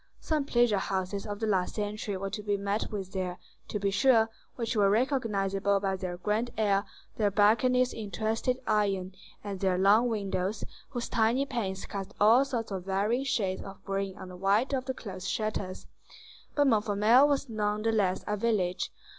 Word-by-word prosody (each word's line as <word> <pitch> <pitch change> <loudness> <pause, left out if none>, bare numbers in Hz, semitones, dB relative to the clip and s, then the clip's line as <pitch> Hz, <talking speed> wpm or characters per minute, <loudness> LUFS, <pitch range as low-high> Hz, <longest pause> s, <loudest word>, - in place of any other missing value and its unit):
Some 305 -3 -1
pleasure 240 -6 +3
houses 190 +2 -3
of 205 0 -5
the 225 - -1
last 190 -4 0
century 210 -1 -3
were 195 +1 -4
to 210 - -4
be 205 -1 0
met 200 +2 -2
with 195 -3 -5
there, 185 -2 -3 0.3
to 210 - -3
be 200 0 0
sure, 225 +1 +4 0.2
which 230 -1 -2
were 200 -2 +4
recognizable 200 -5 +1
by 195 -1 -1
their 185 -2 -5
grand 215 +6 -1
air, 200 -2 +2 0.3
their 210 -2 +2
balconies 240 +5 +3
in 215 -3 -6
twisted 220 +5 -1
iron, 195 -3 0 0.3
and 200 -2 -5
their 185 -1 +1
long 210 +6 +5
windows, 200 -2 -2 0.3
whose 240 -3 -4
tiny 230 +4 +2
panes 195 -8 -3
cast 200 0 -6
all 225 +6 +6
sorts 240 -6 -3
of 185 -2 -4
varying 210 +7 0
shades 205 -9 0
of 195 0 -11
green 195 0 -2
on 190 - -8
the 180 - -9
white 200 +8 +1
of 260 -1 -1
the 260 0 -3
closed 190 -3 -7
shutters; 205 -4 -3 0.7
but 290 - +4
Montfermeil 220 +2 +4
was 285 -1 0
nonetheless 210 -3 0
a 210 - -1
village. 195 -5 0
205 Hz, 175 wpm, -29 LUFS, 195-230 Hz, 0.7 s, all